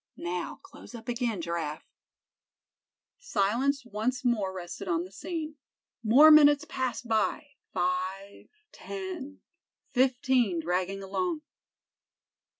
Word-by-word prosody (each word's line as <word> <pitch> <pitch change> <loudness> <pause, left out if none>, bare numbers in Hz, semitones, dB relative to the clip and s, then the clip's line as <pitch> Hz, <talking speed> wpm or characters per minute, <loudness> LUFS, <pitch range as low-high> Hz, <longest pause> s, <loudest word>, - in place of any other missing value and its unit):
Now, 175 0 -3
close - - -13
up 230 -1 -10
again, 235 -5 -1
Giraffe." 165 -3 -3 1.3
Silence 265 - 0
once 245 +3 -2
more 215 -6 +1
rested 185 +1 -7
on 170 -1 +1
the 185 - -11
scene. 310 - -5 0.5
More 270 +8 +8
minutes 295 0 +7
passed 255 -3 -3
by—five, 195 -5 -2 0.2
ten, 360 -8 -7 0.5
fifteen 250 -6 +2
dragging 185 +4 -1
along. 310 - -2
230 Hz, 95 wpm, -29 LUFS, 185-280 Hz, 1.3 s, More